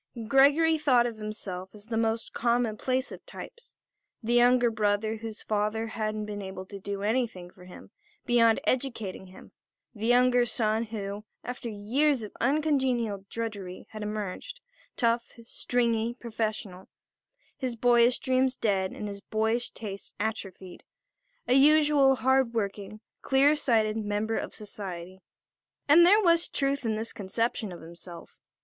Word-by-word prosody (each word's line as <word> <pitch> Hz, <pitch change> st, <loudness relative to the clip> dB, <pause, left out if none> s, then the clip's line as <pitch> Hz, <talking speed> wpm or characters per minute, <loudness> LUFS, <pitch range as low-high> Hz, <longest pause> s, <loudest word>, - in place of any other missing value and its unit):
Gregory 290 Hz, +5 st, +5 dB
thought 255 Hz, -5 st, +4 dB
of 235 Hz, -2 st, -4 dB
himself 200 Hz, -3 st, -6 dB
as 205 Hz, 0 st, -11 dB
the 225 Hz, 0 st, -4 dB
most 225 Hz, 0 st, -1 dB
commonplace 245 Hz, +2 st, 0 dB
of -, -, -10 dB
types; 475 Hz, 0 st, -10 dB, 0.5 s
the 235 Hz, +2 st, 0 dB
younger 240 Hz, -1 st, +4 dB
son 215 Hz, +1 st, 0 dB
whose 225 Hz, -1 st, -7 dB
father 215 Hz, +1 st, -1 dB
hadn't 215 Hz, -1 st, -3 dB
been 205 Hz, -1 st, -5 dB
able 190 Hz, -1 st, -7 dB
to 200 Hz, +1 st, -9 dB
do 200 Hz, +1 st, -5 dB
anything 215 Hz, -6 st, -1 dB
for 180 Hz, -, -16 dB
him 180 Hz, -, -13 dB, 0.3 s
beyond 230 Hz, -3 st, +4 dB
educating 230 Hz, -8 st, -2 dB
him; 185 Hz, -, -15 dB, 0.4 s
the 220 Hz, -1 st, -4 dB
younger 245 Hz, 0 st, +4 dB
son 220 Hz, -1 st, 0 dB
who, 205 Hz, -2 st, -5 dB, 0.2 s
after 245 Hz, -1 st, -5 dB
years 240 Hz, +6 st, +1 dB
of 210 Hz, -, -7 dB
uncongenial 260 Hz, -7 st, +1 dB
drudgery 205 Hz, -5 st, -5 dB
had 215 Hz, -, -7 dB
emerged, 210 Hz, -, -5 dB, 0.4 s
tough, 235 Hz, 0 st, +1 dB
stringy, 235 Hz, -1 st, -1 dB
professional, 215 Hz, -5 st, -4 dB, 0.7 s
his 255 Hz, -3 st, -3 dB
boyish 240 Hz, +1 st, +4 dB
dreams 260 Hz, 0 st, +1 dB
dead 195 Hz, -5 st, 0 dB
and 210 Hz, -, -5 dB
his 200 Hz, -1 st, -7 dB
boyish 220 Hz, +3 st, -1 dB
tastes 200 Hz, -3 st, -8 dB
atrophied; 195 Hz, -4 st, -5 dB, 0.6 s
a -, -, +3 dB
useful 290 Hz, -1 st, +5 dB
hard 260 Hz, 0 st, +2 dB
working, 205 Hz, 0 st, -3 dB, 0.2 s
clear 275 Hz, +2 st, +4 dB
sighted 225 Hz, -6 st, +1 dB
member 210 Hz, +1 st, -1 dB
of -, -, -4 dB
society. 190 Hz, -4 st, -7 dB, 0.7 s
And 335 Hz, +4 st, +7 dB
there 420 Hz, +3 st, +6 dB
was 335 Hz, -1 st, +3 dB
truth 275 Hz, -2 st, -1 dB
in 220 Hz, -, 0 dB
this 220 Hz, +1 st, -4 dB
conception 215 Hz, +1 st, -2 dB
of 175 Hz, -, -9 dB
himself. 170 Hz, +1 st, -11 dB
225 Hz, 140 wpm, -28 LUFS, 205-250 Hz, 0.7 s, And